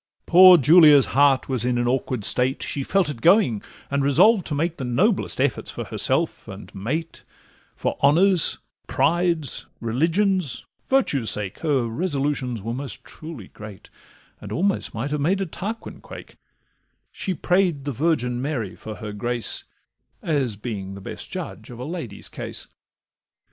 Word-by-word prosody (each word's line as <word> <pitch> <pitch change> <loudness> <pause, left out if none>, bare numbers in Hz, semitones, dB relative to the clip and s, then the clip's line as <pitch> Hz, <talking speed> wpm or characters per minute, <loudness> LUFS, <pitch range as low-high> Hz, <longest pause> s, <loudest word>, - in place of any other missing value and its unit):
Poor 185 +1 +8
Julia's 150 -1 +7
heart 140 -1 +4
was 130 -4 -2
in 125 0 0
an 120 0 0
awkward 125 -2 -1
state; 125 +5 +1
She 140 - -3
felt 195 +7 +1
it 140 -6 -5
going, 170 - +4 0.3
and 140 0 +1
resolved 185 - +4
to 150 - -3
make 165 +3 -1
The 135 - -5
noblest 125 -1 0
efforts - - 0
for - - -5
herself - - 0
and - - -10
mate, 155 +12 -4 0.5
For - - -3
honour's, 170 +5 +4 0.3
pride's, 170 -4 0
religion's, 165 - 0 0.2
virtue's 145 - +1
sake; 100 -3 -1
Her 145 -6 +1
resolutions 135 - -2
were 115 +2 -3
most 135 +2 -6
truly 155 - -10
great, 105 -2 -12 0.5
And - - -10
almost 195 -5 -1
might 125 +6 -3
have 150 -1 -1
made 185 +7 +1
a 195 - -1
Tarquin 210 +6 -7
quake: - - -12 0.7
She 190 -2 -3
pray'd 175 -5 +1
the 145 - -2
Virgin 125 -4 0
Mary 125 -9 -3
for 110 -1 -8
her 105 -2 -7
grace, 120 +2 -1 0.6
As 135 -9 -1
being 100 -3 -6
the 100 - -10
best - - -7
judge - - -7
of 120 - -10
a 125 - -6
lady's 150 - -6
case. - - -4
140 Hz, 155 wpm, -23 LUFS, 120-170 Hz, 0.7 s, Poor